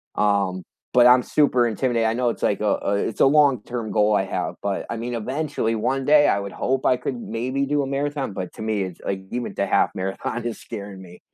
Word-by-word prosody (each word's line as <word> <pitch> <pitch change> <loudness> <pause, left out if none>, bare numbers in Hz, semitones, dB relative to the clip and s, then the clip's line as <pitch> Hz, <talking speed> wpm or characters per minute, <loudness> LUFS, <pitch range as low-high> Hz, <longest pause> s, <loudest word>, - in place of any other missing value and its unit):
um, 100 -3 +1 0.3
but 125 0 +7
I'm 125 0 +6
super 130 -5 +2
intimidated, 115 +1 0
I - - 0
know 125 -1 +1
it's - - -5
like 100 - +1
a, 105 -1 0
uh, 100 - +1
it's 110 - -2
a - - +7
long-term 130 -6 +2
goal 105 0 +3
I 95 - +2
have, - - -3
but 100 -1 -2
I 115 - -3
mean, 120 +2 -4
eventually, 130 -1 -2
one 135 +5 -1
day, 145 +1 +5
I - - +3
would 100 -1 -6
hope 130 +1 -1
I 125 - +4
could 125 - -4
maybe 130 - -2
do 145 +1 0
a 135 - -2
marathon, 140 -4 -2
but 90 -2 -5
to - - -9
me, 110 -3 -1
it's 90 -2 -7
like, 95 -1 -2
even 120 0 -3
the - - 0
half - - +2
marathon 95 +5 -3
is 120 - -4
scaring 100 -4 -8
me. 90 -1 -13
115 Hz, 235 wpm, -23 LUFS, 100-135 Hz, 0.3 s, but